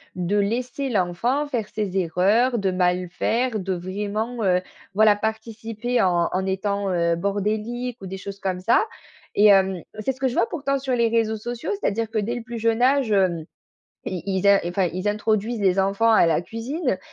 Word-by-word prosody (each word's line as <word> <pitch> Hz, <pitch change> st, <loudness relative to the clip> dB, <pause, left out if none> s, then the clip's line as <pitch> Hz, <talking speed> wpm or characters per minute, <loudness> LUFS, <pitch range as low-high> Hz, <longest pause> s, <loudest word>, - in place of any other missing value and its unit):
de 180 Hz, +3 st, 0 dB
laisser 250 Hz, +6 st, -1 dB
l'enfant 230 Hz, +8 st, 0 dB
faire 235 Hz, -7 st, -2 dB
ses 200 Hz, -3 st, -3 dB
erreurs, 200 Hz, +8 st, +2 dB
de 195 Hz, -1 st, 0 dB
mal 180 Hz, 0 st, +1 dB
faire, 230 Hz, +4 st, 0 dB
de 190 Hz, 0 st, -2 dB
vraiment, 210 Hz, +6 st, -3 dB
heu, 180 Hz, -1 st, +3 dB, 0.3 s
voilà, 210 Hz, 0 st, +5 dB
participer 220 Hz, +2 st, -2 dB
en 175 Hz, -2 st, +2 dB
en 190 Hz, +1 st, -1 dB
étant, 200 Hz, +1 st, -1 dB
heu, 170 Hz, -1 st, +2 dB
bordélique 215 Hz, +6 st, -2 dB
ou 190 Hz, -, -7 dB
des 190 Hz, +1 st, -6 dB
choses 200 Hz, +1 st, -8 dB
comme 185 Hz, -2 st, -2 dB
ça. 225 Hz, -, +3 dB, 0.5 s
Et 205 Hz, -, +5 dB
hem, 190 Hz, -3 st, +4 dB, 0.2 s
c'est 215 Hz, +5 st, 0 dB
ce 260 Hz, -, -12 dB
que 265 Hz, -, +1 dB
je 245 Hz, -, -2 dB
vois 230 Hz, -, +2 dB
pourtant 275 Hz, -3 st, -1 dB
sur 265 Hz, -1 st, -2 dB
les 235 Hz, -1 st, +3 dB
réseaux 220 Hz, -1 st, +1 dB
sociaux, 240 Hz, -, -5 dB
c'est-à-dire 225 Hz, +2 st, -1 dB
que 220 Hz, -, 0 dB
dès 225 Hz, +4 st, -2 dB
le 240 Hz, -, -5 dB
plus 235 Hz, -1 st, -6 dB
jeune 230 Hz, +1 st, +1 dB
âge 265 Hz, -2 st, +3 dB
hem, 185 Hz, -5 st, +2 dB, 0.6 s
ils 180 Hz, -2 st, -3 dB
ils 190 Hz, 0 st, 0 dB
in 200 Hz, 0 st, +7 dB
enfin, 180 Hz, +1 st, 0 dB
ils 185 Hz, +4 st, -2 dB
introduisent 215 Hz, +2 st, 0 dB
les 190 Hz, -1 st, +3 dB
enfants 195 Hz, +4 st, +2 dB
à 220 Hz, -6 st, +5 dB
la 165 Hz, +1 st, +2 dB
cuisine 235 Hz, -, -3 dB
210 Hz, 195 wpm, -23 LUFS, 190-235 Hz, 0.6 s, in